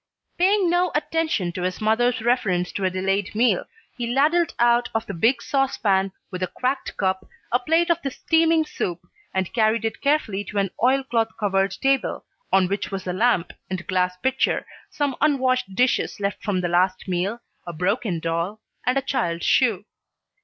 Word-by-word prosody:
Paying 385 +1 +3
no 350 0 +2
attention 310 - 0
to 180 - -5
his 180 0 -2
mother's 240 +3 +2
reference 200 -7 +1
to 200 - -4
a - - +3
delayed 195 +3 -1
meal, 235 +3 +2 0.3
he 240 -2 -3
ladled 310 +6 +2
out 240 0 +3
of 225 0 0
the - - -5
big 235 +7 +2
saucepan, 205 -8 +1 0.2
with 185 -1 -5
a 185 - 0
cracked 255 +8 -3
cup, 190 -1 0 0.3
a 245 - +3
plate 325 +6 +2
of 340 0 +1
the 280 - -2
steaming 325 +3 +2
soup, 175 - -3 0.3
and 190 -1 -2
carried 225 0 +2
it 225 - -3
carefully 280 -9 +1
to 210 - -6
an 195 -2 +1
oilcloth 245 -3 +1
covered 195 -2 +1
table, 270 0 0 0.3
on 190 -1 +4
which 200 +2 -2
was 195 -2 -5
a 180 - -2
lamp 185 -3 +1 0.2
and 185 -1 -4
glass 180 -1 0
pitcher, 260 +6 0 0.2
some 285 -3 -1
unwashed 255 -8 +1
dishes 250 -1 +1
left 200 -1 -3
from 195 -4 0
the 175 - 0
last 185 +3 +1
meal, 190 +5 -1 0.3
a - - -3
broken 180 +2 -1
doll, 170 +6 -2 0.3
and 250 +2 +3
a 270 - 0
child's 170 -11 -1
shoe. 220 -7 +2
220 Hz, 175 wpm, -23 LUFS, 185-265 Hz, 0.3 s, on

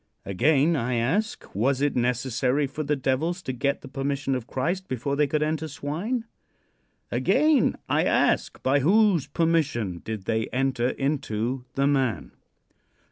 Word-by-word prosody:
Again 140 - +3
I 125 -3 -1
ask: 170 - -1
Was 130 +7 +1
it 145 0 +1
necessary 125 +3 +1
for 140 +3 -5
the 150 0 0
devils 155 +7 -1
to 130 - -3
get 140 +3 -1
the - - -10
permission 135 0 -2
of 125 -2 -3
Christ 175 +8 -2
before 130 +3 -2
they 150 0 +2
could 150 +2 0
enter 155 +1 -1
swine? 170 - -3 0.9
Again 305 -2 +3
I - - +2
ask: - - +1
By 135 +2 +3
whose 190 +1 +3
permission 145 - 0
did 110 -3 -5
they 110 0 0
enter 130 -1 0
into 130 -3 -2
the 135 - +2
man? 130 - 0
135 Hz, 145 wpm, -25 LUFS, 125-155 Hz, 0.9 s, Again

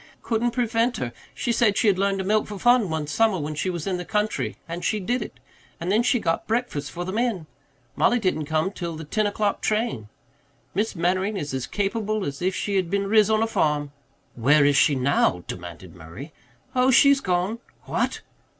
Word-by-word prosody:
Couldn't 235 +1 0
prevent 235 0 0
her. 120 - -4 0.2
She 240 - -1
said 225 -3 +2
she - - +2
had 195 -3 +3
learned 195 0 +1
to 190 - -2
milk 210 +3 +1
for 210 - -6
fun 240 -2 +4
one 160 -1 -2
summer 195 +7 +2
when 150 -1 -3
she 155 +5 -2
was 170 -4 -4
in 190 -2 -1
the 180 - -4
country, 210 +3 -1
and 170 +1 -5
she 215 - 0
did 240 +6 -1
it. - - -8 0.4
And 175 +3 -2
then 215 +3 +4
she 245 +1 +2
got 165 -5 -1
breakfast 220 - -1
for 175 +6 -5
the 185 - -4
men 220 -6 -1 0.5
Mollie 245 - +3
didn't 185 -8 -1
come 160 +4 0
till 170 -4 -5
the 160 - -7
ten 210 +8 0
o'clock 205 0 -1
train. 215 - -1 0.6
Miss 215 +1 -1
Mannering 185 +4 0
is 145 -6 -4
as 130 -2 -3
capable 210 0 -1
as 140 +2 -5
if 185 +1 0
she 200 -1 -1
had 185 -3 0
been 200 +1 0
riz 215 +1 +4
on 220 0 +3
a - - +1
farm." 150 -8 0 0.4
"Where 140 +5 +4
is 145 0 +4
she 145 - +4
now?" 125 -9 +1
demanded 85 0 -8
Murray. 90 - -10 0.4
"Oh, 255 +1 +4
she's 280 +1 +6
gone." 185 +4 -1 0.2
"What?" - - -2
190 Hz, 205 wpm, -24 LUFS, 155-220 Hz, 0.6 s, she's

